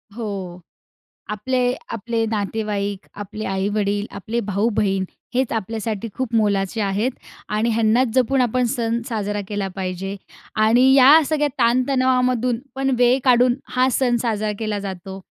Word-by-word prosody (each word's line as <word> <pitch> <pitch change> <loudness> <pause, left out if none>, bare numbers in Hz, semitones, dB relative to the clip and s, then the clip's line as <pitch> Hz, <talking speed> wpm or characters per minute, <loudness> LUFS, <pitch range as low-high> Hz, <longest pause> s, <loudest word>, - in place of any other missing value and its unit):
हो. 195 -6 -5 0.7
आपले, 250 +5 -1 0.3
आपले 230 +1 -1
नातेवाईक, 205 -2 -2
आपले 210 +1 -6
आई-वडील, 205 +1 -1
आपले 220 +4 -3
भाऊ-बहीण 200 -1 +1 0.3
हेच 260 -1 +1
आपल्यासाठी 220 0 -3
खूप 250 -3 -3
मोलाचे 205 0 +1
आहेत 205 +5 0 0.4
आणि 215 +2 0
ह्यांनाच 230 +3 +3
जपून 260 +1 +2
आपण 250 0 +1
सण 230 0 -1
साजरा 205 -2 -2
केला 205 -2 -2
पाहिजे. 190 +1 -4 0.4
आणि 235 +5 +5
या 275 +4 +8
सगळ्या 295 -1 +1
ताणतणावामधून 255 -1 +2 0.2
पण 270 0 0
वेळ 245 +1 +4
काढून 245 -1 +5 0.2
हा 255 +1 +4
सण 245 -1 +2
साजरा 215 -2 -1
केला 215 -2 -2
जातो. 190 -1 -7
220 Hz, 130 wpm, -21 LUFS, 205-250 Hz, 0.7 s, या